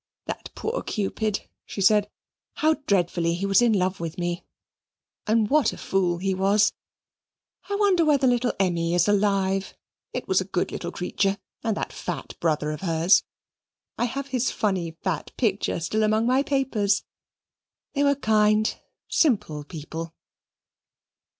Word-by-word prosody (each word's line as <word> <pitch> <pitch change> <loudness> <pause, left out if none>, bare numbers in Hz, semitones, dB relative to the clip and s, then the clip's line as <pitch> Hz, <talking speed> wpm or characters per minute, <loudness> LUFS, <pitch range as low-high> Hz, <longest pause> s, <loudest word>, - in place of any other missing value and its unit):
"That - - -6
poor 470 +3 -2
Cupid!" 210 0 -2 0.2
she - - -8
said; 205 +1 +4 0.5
"how 310 +1 +3
dreadfully 175 -3 +1
he 190 +3 -2
was 195 +3 +4
in 240 -1 +4
love 190 -1 +1
with 165 +1 -5
me, 175 -1 -2 0.8
and 220 0 +3
what 300 +4 +3
a - - -9
fool 180 -3 0
he 190 +2 -1
was! 200 +3 +3 1.0
I 405 - 0
wonder 400 -4 +3
whether 290 -3 +3
little 245 -1 +2
Emmy 170 -3 +1
is 175 +2 +3
alive. 195 -1 +1 0.4
It - - -5
was 190 0 +3
a - - -4
good 180 -2 -1
little 175 - -4
creature; 195 +3 -1 0.3
and 225 -3 0
that - - -4
fat - - -5
brother 150 -2 0
of 150 - -6
hers. 170 +1 +4 0.7
I 240 - 0
have 275 +3 -4
his 255 -2 0
funny 180 -6 -1
fat 175 -6 -2
picture 205 -6 0
still 215 +6 -1
among 215 +1 +2
my 255 +3 +3
papers. 250 -8 +1 0.9
They 285 - +1
were 280 0 +4
kind 215 -3 +2 0.3
simple 210 - +1
people." 160 +1 -7
200 Hz, 150 wpm, -25 LUFS, 175-230 Hz, 1.0 s, said